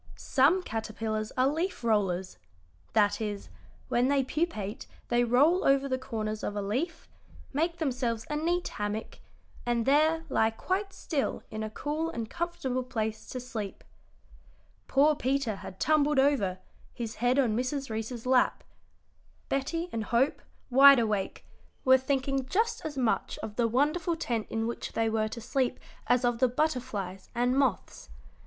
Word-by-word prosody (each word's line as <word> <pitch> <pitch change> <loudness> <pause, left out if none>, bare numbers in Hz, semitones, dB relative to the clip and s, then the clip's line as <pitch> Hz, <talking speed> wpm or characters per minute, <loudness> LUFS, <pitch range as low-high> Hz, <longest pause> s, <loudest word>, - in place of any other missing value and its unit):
"Some 305 +8 +3
caterpillars 220 -2 -3
are 255 +1 +4
leaf 320 0 -2
rollers 190 -5 0 0.6
that 205 +1 +3
is, 205 -2 -4 0.4
when 245 +1 +2
they 275 -1 +3
pupate 250 - -3 0.2
they 240 0 +3
roll 285 +10 +4
over 275 0 +3
the 260 -1 -1
corners 215 -4 -4
of 205 - -3
a 205 - -1
leaf, 265 - -2 0.5
make 335 +4 0
themselves 250 -7 -1
a 300 - -3
neat 345 +4 0
hammock, 210 +1 -4 0.4
and 240 -1 0
there 315 +4 +3
lie 220 -6 +2
quite 375 - -2
still 300 -7 -2
in 215 0 -4
a 215 - -3
cool 300 +8 -2
and 230 -8 -5
comfortable 335 -7 -2
place 220 -4 -3
to 255 - -4
sleep." 220 -5 -6 1.0
Poor 290 +3 +4
Peter 260 -6 0
had 190 - -10
tumbled 300 -1 +3
over, 265 -10 +3 0.4
his 230 -2 -5
head 245 +3 +2
on 240 -6 +3
Mrs. 255 +1 -2
Reece's 225 +2 -4
lap. 255 0 +3 0.9
Betty 330 +5 -1
and 225 -2 -2
Hope, 240 +6 +1 0.3
wide 275 +2 +9
awake, 215 -4 -1 0.4
were 260 0 +7
thinking 270 0 -1
just 445 - 0
as 295 -3 -5
much 245 -4 0
of 210 - -5
the 235 0 +2
wonderful 300 +8 +1
tent 235 -9 -2
in 225 0 -1
which 235 - -4
they 225 -1 +1
were 215 -1 +1
to 225 +2 -6
sleep 255 +2 -1 0.3
as 250 0 +3
of 240 -1 +1
the 255 - +5
butterflies 240 - -2
and 245 +2 +2
moths. 255 - -1
250 Hz, 155 wpm, -29 LUFS, 220-285 Hz, 1.0 s, wide